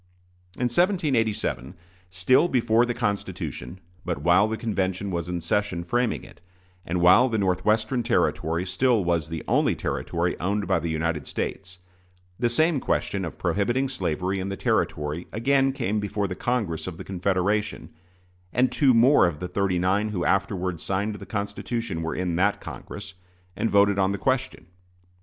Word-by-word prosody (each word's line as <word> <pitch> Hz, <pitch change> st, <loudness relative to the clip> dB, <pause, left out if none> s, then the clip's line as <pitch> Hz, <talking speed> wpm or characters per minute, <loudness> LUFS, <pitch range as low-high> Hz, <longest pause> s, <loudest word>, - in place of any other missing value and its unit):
In -, -, -9 dB
1787, 125 Hz, -, 0 dB, 0.3 s
still 95 Hz, -, +3 dB
before 120 Hz, -4 st, +2 dB
the 120 Hz, -, -2 dB
Constitution, 100 Hz, -, -3 dB, 0.2 s
but 90 Hz, -3 st, -2 dB
while 85 Hz, +8 st, +4 dB
the 110 Hz, 0 st, -3 dB
convention 100 Hz, -3 st, -2 dB
was 85 Hz, -1 st, -3 dB
in 90 Hz, -1 st, -3 dB
session 90 Hz, 0 st, -1 dB
framing 120 Hz, +7 st, 0 dB
it, -, -, -15 dB, 0.4 s
and 85 Hz, +1 st, -2 dB
while 95 Hz, +9 st, +6 dB
the 115 Hz, -, 0 dB
Northwestern 110 Hz, +5 st, +1 dB
Territory 90 Hz, -7 st, 0 dB
still 110 Hz, +4 st, +2 dB
was 85 Hz, -3 st, 0 dB
the 80 Hz, -2 st, -5 dB
only -, -, +2 dB
Territory 85 Hz, +1 st, -2 dB
owned 100 Hz, +3 st, -1 dB
by -, -, +2 dB
the 85 Hz, +1 st, -3 dB
United 80 Hz, -2 st, -2 dB
States, 90 Hz, -1 st, -5 dB, 0.6 s
the 120 Hz, -1 st, +2 dB
same 155 Hz, +5 st, +2 dB
question 100 Hz, -5 st, -1 dB
of 80 Hz, -, -6 dB
prohibiting 120 Hz, +7 st, 0 dB
slavery 95 Hz, -, -2 dB
in 95 Hz, +1 st, -3 dB
the 100 Hz, -, -4 dB
Territory 75 Hz, +3 st, -1 dB
again 135 Hz, +4 st, +2 dB
came 115 Hz, -6 st, -1 dB
before 105 Hz, 0 st, -2 dB
the 90 Hz, -, -4 dB
Congress 105 Hz, -8 st, -2 dB
of 85 Hz, -3 st, -6 dB
the -, -, -7 dB
Confederation; 100 Hz, +2 st, -1 dB, 0.6 s
and 125 Hz, +1 st, +2 dB
two 130 Hz, 0 st, +4 dB
more 120 Hz, -3 st, +6 dB
of 75 Hz, -4 st, -4 dB
the 90 Hz, -, -4 dB
"thirty 95 Hz, 0 st, 0 dB
nine" 95 Hz, +4 st, +1 dB
who 90 Hz, -5 st, -2 dB
afterward 95 Hz, -3 st, 0 dB
signed 100 Hz, +3 st, -1 dB
the 105 Hz, -, -9 dB
Constitution 100 Hz, -2 st, -3 dB
were 80 Hz, 0 st, -3 dB
in 90 Hz, -2 st, -1 dB
that 100 Hz, +3 st, +2 dB
Congress, 100 Hz, -1 st, -9 dB, 0.4 s
and 115 Hz, -, 0 dB
voted 100 Hz, 0 st, +4 dB
on 95 Hz, 0 st, +2 dB
the -, -, -2 dB
question. 130 Hz, -, -1 dB
100 Hz, 160 wpm, -25 LUFS, 90-115 Hz, 0.6 s, while